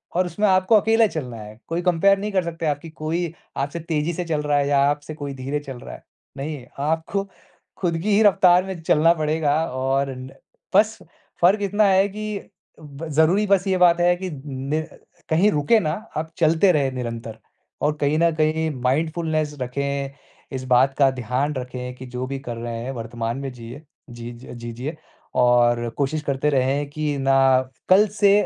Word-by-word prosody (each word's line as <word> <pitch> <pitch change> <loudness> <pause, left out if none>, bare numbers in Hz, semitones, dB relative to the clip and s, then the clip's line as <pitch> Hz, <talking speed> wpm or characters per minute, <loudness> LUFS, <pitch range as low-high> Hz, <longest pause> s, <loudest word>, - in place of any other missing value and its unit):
और 180 +1 +2
उसमें 205 +4 0
आपको 185 +3 +4
अकेला 225 +1 +4
चलना 125 - -5
है। 105 +1 -11
कोई 170 +2 -2
कंपेयर 185 +3 +3
नहीं 210 +1 -3
कर 185 -2 +1
सकता 165 -1 -5
है 150 - +3
आपकी 145 +3 -6
कोई 165 +2 -3 0.2
आपसे 140 +5 -2
तेज़ी 160 0 -2
से 175 +2 -3
चल 155 -3 -1
रहा 150 -1 +1
है 140 - +1
या 140 -1 +3
आपसे 145 +1 -3
कोई 145 -2 -6
धीरे 135 +3 -3
चल 135 -4 -9
रहा - - -9
है। - - -15 0.3
नहीं 140 -2 -5 0.2
आपको 160 +5 -1 0.6
ख़ुद 170 -2 0
की 210 0 +2
ही 215 - +5
रफ़्तार 180 -3 +5
में 190 -4 -6
चलना 165 +1 +4
पड़ेगा 155 -2 0
और 135 +2 -1
न 130 +1 -8 0.5
बस - - +4 0.4
फ़र्क 195 +4 +4
इतना 205 +2 +2
है 195 +1 +4
कि 210 0 -6 0.3
ब 150 +1 -9
ज़रूरी 160 +8 +3
बस 195 0 +2
ये 190 -1 +2
बात 175 -1 +5
है 175 0 +4
कि 185 +1 -5 0.2
नि 140 +3 -2 0.5
कहीं 180 +7 +4
रुके 150 +10 +3
ना 155 -6 -1 0.3
आप 160 +1 -3
चलते 165 +3 +4
रहे 140 -4 +1
निरंतर 115 -3 -5 0.4
और 150 +1 +2
कहीं 145 +1 +2
न 170 0 +4
कहीं 160 0 +1
माइंडफ़ुलनेस 155 +2 0
रखें। 140 +2 -2 0.4
इस 130 - -4
बात 135 +2 +4
का 135 -2 +5
ध्यान 130 +4 -2
रखें 125 -1 -5
कि 130 - -10
जो 125 0 -5
भी 135 +1 -4
कर 120 -3 -6
रहे 115 0 -5
हैं 130 - -4
वर्तमान 115 0 -4
में 135 -1 -5
जिए। 120 +4 -10 0.3
जीज 120 +1 -9
अ, - - -7
जी 120 -1 -7
जिए 135 +7 -5 0.4
और 120 -1 +3
कोशिश 145 +2 0
करते 140 +1 0
रहें 140 +1 +1
कि 150 0 -2
ना 135 0 +2 0.6
कल 200 +3 +6
से 200 -1 +6
150 Hz, 190 wpm, -22 LUFS, 130-170 Hz, 0.6 s, कल